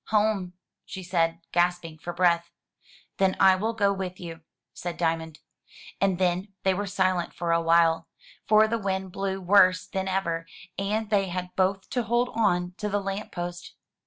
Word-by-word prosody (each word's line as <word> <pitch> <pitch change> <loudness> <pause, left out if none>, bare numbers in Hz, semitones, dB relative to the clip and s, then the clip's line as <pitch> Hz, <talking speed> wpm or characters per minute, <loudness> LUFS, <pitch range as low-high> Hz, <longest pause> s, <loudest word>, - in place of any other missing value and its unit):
"Home," 210 -4 +1 0.3
she 190 -1 -8
said, 170 -2 0
gasping 175 -2 0
for 175 - -5
breath. 170 -1 +2 0.7
"Then 190 -1 +2
I 190 -1 +7
will 220 +5 -1
go 200 -3 +2
with 185 -2 -5
you,'' 165 -2 -8 0.3
said 175 -1 -5
Diamond. 160 -2 -1 0.6
And 195 -2 +2
then 185 +2 0
they 190 - +3
were 205 +2 -3
silent 185 -2 0
for 170 -1 -1
a 165 0 +3
while, 165 0 +3 0.4
for 215 +1 +6
the 230 +1 -1
wind 190 -2 -2
blew 195 0 -2
worse 185 -1 +4
than 190 0 -3
ever, 170 -3 -1 0.3
and 210 +2 -2
they 200 -2 +3
had 180 0 -5
both 190 +1 +1
to 245 - +1
hold 240 +2 +1
on 180 -5 +1
to 210 - -3
the 205 0 0
lamp 195 +1 -4
post. 175 0 -6
185 Hz, 170 wpm, -26 LUFS, 175-200 Hz, 0.7 s, I